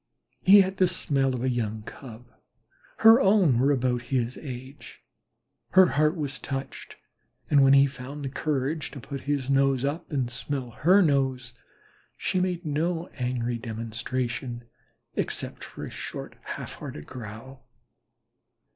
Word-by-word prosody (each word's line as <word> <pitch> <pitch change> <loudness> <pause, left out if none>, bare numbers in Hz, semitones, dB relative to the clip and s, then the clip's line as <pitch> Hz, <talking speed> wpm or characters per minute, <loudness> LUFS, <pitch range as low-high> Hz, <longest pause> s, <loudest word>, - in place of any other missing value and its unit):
He 200 +2 +8
had 190 0 -2
the 185 - +4
smell 135 -5 0
of 125 - -4
a 130 - +1
young 110 -3 -2
Cub. 120 0 -11 0.8
Her 225 +3 +9
own 190 - +4
were 135 +3 +3
about 125 -2 +1
his 125 -1 -1
age, 130 0 -9 0.7
her 185 -1 +7
heart 155 +3 +2
was 145 -4 -4
touched, 135 0 -6 0.6
and 140 -2 +6
when 135 0 +6
he 140 0 +7
found 140 +1 -6
courage 150 +1 -2
enough 135 - -9
to - - -14
put 140 -2 -5
his 140 -2 0
nose 135 -1 +3
up 155 +5 -3
and 130 -5 -1
smell 120 +2 -3
her 185 - +4
nose, 130 -5 0 0.6
she 185 - -1
made 180 -1 -1
no 165 +3 -1
angry 125 -2 -2
demonstration 120 +2 -4 0.5
except - - -2
a - - -5
short - - -7
half - - -6
hearted 75 - -8
growl. 125 +2 -10
135 Hz, 140 wpm, -26 LUFS, 125-150 Hz, 0.8 s, Her